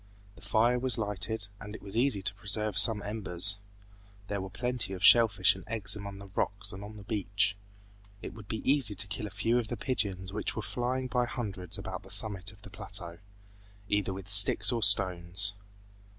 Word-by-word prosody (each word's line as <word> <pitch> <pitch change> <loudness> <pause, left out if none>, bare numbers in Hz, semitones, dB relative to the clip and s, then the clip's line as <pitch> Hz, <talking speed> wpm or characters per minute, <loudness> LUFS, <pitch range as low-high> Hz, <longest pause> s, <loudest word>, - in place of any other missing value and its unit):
The - - -18
fire 110 +4 0
was 130 -1 +3
lighted, 105 0 -2
and 105 0 -10
it - - -13
was 100 0 -5
easy 120 -5 +1
to 95 - 0
preserve 105 +1 -1
some 105 +1 +6
embers. 100 -2 +1 0.7
There 100 -1 -4
were 95 - -8
plenty 125 -2 -3
of 95 0 -8
shell 115 +1 +7
fish 95 -2 +2
and 95 - -12
eggs 105 -3 +2
among 100 -1 -9
the 100 - -12
rocks 100 0 -4
and 95 +1 -10
on 105 +1 -11
the 100 - -12
beach. 100 -1 -1 0.6
It - - -9
would 110 -3 -14
be 110 - -7
easy 135 -7 +3
to 105 - 0
kill 105 +2 -6
a - - -9
few 110 +5 -1
of 115 - -5
the 120 - -6
pigeons 100 -6 -4
which 105 - -3
were 110 - -5
flying 125 +4 -4
by 125 -1 -1
hundreds 100 -7 -4
about - - -7
the - - -17
summit 100 -1 -2
of 100 0 -21
the 100 - -13
plateau, 95 -4 -4 0.7
either 105 -2 -1
with 95 0 -9
sticks 100 +4 +7
or 120 -2 -3
stones. 95 0 +3
105 Hz, 200 wpm, -28 LUFS, 95-110 Hz, 0.7 s, shell